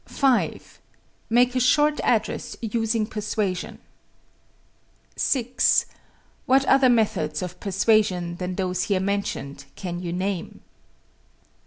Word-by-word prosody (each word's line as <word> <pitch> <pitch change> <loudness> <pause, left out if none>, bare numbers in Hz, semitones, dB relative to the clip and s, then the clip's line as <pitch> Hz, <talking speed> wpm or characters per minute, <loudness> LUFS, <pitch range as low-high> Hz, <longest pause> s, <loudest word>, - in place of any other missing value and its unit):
5. 270 -4 0 0.5
Make 245 +2 +3
a - - +2
short 295 +4 +3
address - - -1
using 225 0 -1
persuasion. 210 -3 -3 1.4
6. 255 -1 +2 0.6
What 270 +1 +4
other 270 -1 +5
methods 195 -10 +1
of 180 -1 -7
persuasion 195 -3 +1
than 180 0 -4
those 180 -1 -1
here 195 -2 +1
mentioned 190 -8 -3
can 175 -2 -5
you 175 -2 -4
name? 185 0 -4
205 Hz, 105 wpm, -24 LUFS, 180-240 Hz, 1.4 s, other